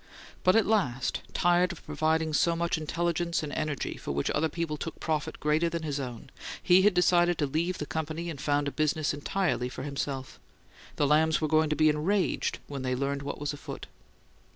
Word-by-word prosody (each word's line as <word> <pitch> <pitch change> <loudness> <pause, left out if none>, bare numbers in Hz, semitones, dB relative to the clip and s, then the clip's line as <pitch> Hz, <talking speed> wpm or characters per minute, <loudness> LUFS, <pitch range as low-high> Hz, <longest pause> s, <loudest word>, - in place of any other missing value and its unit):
But 185 - +5
at 225 - +5
last, 135 - 0
tired 175 +1 +3
of 175 - -11
providing 160 0 0
so 170 +2 +3
much 170 +1 0
intelligence 170 +2 -1
and 150 - -5
energy 155 -3 -2
for - - -5
which 70 0 0
other 160 +2 +1
people 165 -1 -3
took 160 +1 -6
profit 155 -2 -2
greater 155 +3 +2
than 165 -1 -4
his 145 -2 -2
own, 125 -1 -7 0.3
he 180 +1 +5
had 205 -1 +4
decided 175 -1 +4
to 150 - +1
leave 165 +6 -1
the 150 - -4
company 160 +2 -4
and 150 -5 -5
found 145 0 +1
a - - -1
business 155 0 0
entirely 145 -3 -1
for 130 - -7
himself. 140 -2 -4 0.6
The 145 - +2
Lambs 155 +2 +3
were 155 - 0
going 155 0 +3
to 150 - +1
be 155 +1 +4
enraged 165 +7 +1
when 140 -2 -6
they 130 -1 -1
learned 140 +2 -1
what 140 0 -5
was 145 0 -2
afoot. 145 - -8
155 Hz, 200 wpm, -29 LUFS, 145-170 Hz, 0.6 s, But